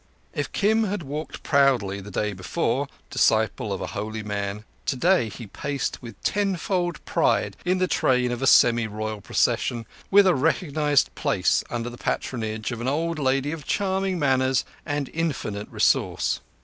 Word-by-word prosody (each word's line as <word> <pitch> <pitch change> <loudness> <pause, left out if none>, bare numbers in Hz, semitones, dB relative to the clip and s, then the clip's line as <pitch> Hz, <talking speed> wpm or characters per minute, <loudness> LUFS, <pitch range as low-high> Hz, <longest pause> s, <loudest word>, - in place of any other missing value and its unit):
If 145 -2 -3
Kim 220 +2 +2
had 200 -3 -3
walked 150 +3 -6
proudly 125 -9 +2
the 100 - -9
day 105 +1 -1
before, 95 -1 -1 0.2
disciple - - +2
of - - -3
a - - -2
holy 110 +1 -4
man, 100 0 -3 0.2
today 160 -2 +2
he 115 +3 -8
paced 140 +7 -3
with 115 -3 -10
tenfold 185 -4 -1
pride - - +1
in 180 +1 +2
the 185 0 +1
train 125 -6 +2
of 120 +1 -3
a 135 - +1
semi 120 -3 +5
royal 110 0 -4
procession, 115 +3 0 0.2
with 200 0 +7
a 185 - +5
recognized 150 0 +1
place - - +1
under 120 0 -3
the 120 - -11
patronage 110 -2 -2
of 120 -1 -5
an 120 - -2
old 160 +4 -1
lady 135 +1 +1
of 160 -2 -6
charming 190 -1 0
manners 130 -3 +2 0.2
and 145 -2 -1
infinite 135 -11 -2
resource. - - +1
135 Hz, 160 wpm, -25 LUFS, 110-165 Hz, 0.2 s, with